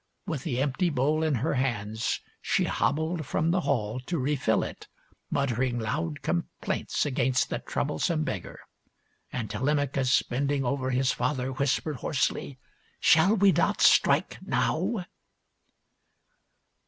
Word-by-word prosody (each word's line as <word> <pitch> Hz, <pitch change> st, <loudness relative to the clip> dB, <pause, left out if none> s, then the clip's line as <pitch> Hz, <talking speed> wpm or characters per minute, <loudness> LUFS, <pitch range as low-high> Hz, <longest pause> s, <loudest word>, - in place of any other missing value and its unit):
With 160 Hz, -9 st, -3 dB
the 130 Hz, -4 st, -2 dB
empty 145 Hz, +6 st, +1 dB
bowl 150 Hz, +2 st, +1 dB
in 155 Hz, -3 st, +1 dB
her -, -, +1 dB
hands, 115 Hz, -4 st, -1 dB, 0.2 s
she -, -, +1 dB
hobbled 160 Hz, +2 st, 0 dB
from 155 Hz, +4 st, 0 dB
the 185 Hz, +1 st, +2 dB
hall 120 Hz, -6 st, -1 dB
to 175 Hz, -, -1 dB
refill 140 Hz, 0 st, +1 dB
it, -, -, -8 dB, 0.4 s
muttering 125 Hz, -2 st, 0 dB
loud 150 Hz, +7 st, -3 dB
complaints 85 Hz, +1 st, -2 dB
against 130 Hz, -2 st, +1 dB
the -, -, -1 dB
troublesome 155 Hz, -, -1 dB
beggar. 100 Hz, -, -5 dB, 0.7 s
And 115 Hz, -4 st, -3 dB
Telemachus, 135 Hz, +3 st, +1 dB
bending 140 Hz, +2 st, -1 dB
over 130 Hz, +1 st, -1 dB
his 130 Hz, 0 st, +2 dB
father, 130 Hz, +1 st, -1 dB
whispered 140 Hz, +2 st, -1 dB
hoarsely, 135 Hz, 0 st, -1 dB, 0.2 s
" -, -, -37 dB
Shall 175 Hz, +7 st, +6 dB
we 200 Hz, -1 st, +5 dB
not -, -, +1 dB
strike -, -, +4 dB
now 210 Hz, -7 st, 0 dB
135 Hz, 130 wpm, -27 LUFS, 125-155 Hz, 0.7 s, Shall